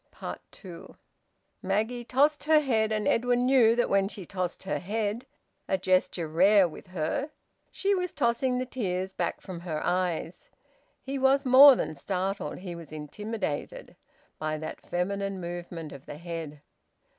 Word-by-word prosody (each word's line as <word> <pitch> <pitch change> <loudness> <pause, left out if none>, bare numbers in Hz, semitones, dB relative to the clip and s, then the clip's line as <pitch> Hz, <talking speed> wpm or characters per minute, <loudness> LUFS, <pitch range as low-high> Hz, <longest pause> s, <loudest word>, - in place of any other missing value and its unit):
TWO. 175 -4 -12 0.6
Maggie 220 +6 -1
tossed 285 +5 +2
her 310 0 +6
head, 225 -7 +1
and 215 -2 0
Edwin 245 +1 +2
knew 250 -4 +5
that 240 - +2
when 195 0 +2
she 195 -2 -7
tossed 180 0 -4
her 190 - -2
head 215 +5 -3 0.4
a 190 - +1
gesture 185 -2 +1
rare 190 +4 +5
with 165 - -12
her 185 - -2 0.4
she 400 +1 0
was 360 -2 -1
tossing 250 0 +1
the 255 - -1
tears 190 -7 -3
back - - -2
from 185 -3 -7
her 165 -3 -4
eyes. 175 -1 -2 0.5
He 270 +1 -4
was 270 +1 +3
more 265 +2 +9
than 160 - -2
startled, 190 +6 -3
he 180 -1 -7
was 170 -3 -10
intimidated, 155 +2 -5 0.4
by 155 0 -2
that 155 +1 -7
feminine 195 +2 -2
movement 175 -2 -6
of 140 0 -12
the 145 - -7
head. 165 -3 -7
195 Hz, 150 wpm, -28 LUFS, 175-245 Hz, 0.6 s, more